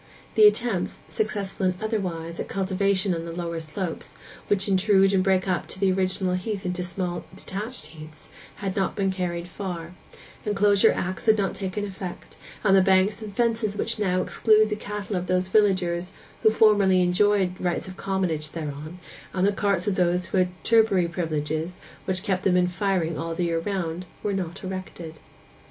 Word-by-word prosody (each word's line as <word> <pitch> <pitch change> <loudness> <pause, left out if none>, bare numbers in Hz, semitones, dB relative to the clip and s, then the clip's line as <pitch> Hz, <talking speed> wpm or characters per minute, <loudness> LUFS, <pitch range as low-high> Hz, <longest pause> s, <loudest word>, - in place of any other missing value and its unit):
The 425 - +8
attempts—successful 210 - -1
and 185 -1 +2
otherwise—at 180 -7 -3
cultivation 195 0 0
on 165 -1 -3
the 170 - -6
lower 170 -1 -3
slopes, 160 +2 -5 0.3
which 200 -1 +1
intrude 195 0 +4
and 190 -1 +3
break 190 -1 +2
up 185 -2 -1
the 190 0 +1
original 185 0 0
heath 195 +2 -3
into 180 0 -2
small 180 -1 -3
detached 205 +2 -5
heaths, 155 -1 -12 0.3
had 195 -2 -4
not 195 -2 0
been 195 -2 +1
carried 175 -2 -3
far; 175 -3 -6 0.5
Enclosure 205 -1 +4
Acts 185 +4 -4
had 220 0 +6
not 195 -2 0
taken 195 +1 -3
effect, 190 -2 -8 0.3
and 195 -2 +5
the 190 - +7
banks 190 +3 +3
and 210 -2 -8
fences 225 -3 +1
which 230 +1 -2
now 185 -3 +1
exclude 215 -1 +3
the - - +1
cattle 210 -1 -5
of 180 0 -2
those 185 +1 +1
villagers 185 -3 +2 0.3
who 220 - +6
formerly 205 -4 +4
enjoyed 185 +1 +3
rights 180 0 -1
of 185 - -8
commonage 185 -6 -1
thereon, 155 +1 -6 0.4
and 185 0 +1
the 200 - +4
carts 200 -2 0
of 205 - +2
those 180 -1 +1
who 190 - 0
had 180 0 -1
turbary 220 -6 +4
privileges 160 0 -2 0.3
which 185 0 -1
kept 190 -4 0
them 180 -2 +3
in 180 0 +3
firing 180 -3 -1
all 165 0 -3
the 175 - -1
year 165 -1 0
round, 180 -1 -3 0.2
were 205 - 0
not 185 -1 -4
erected. 185 -4 -7
185 Hz, 170 wpm, -25 LUFS, 175-200 Hz, 0.5 s, The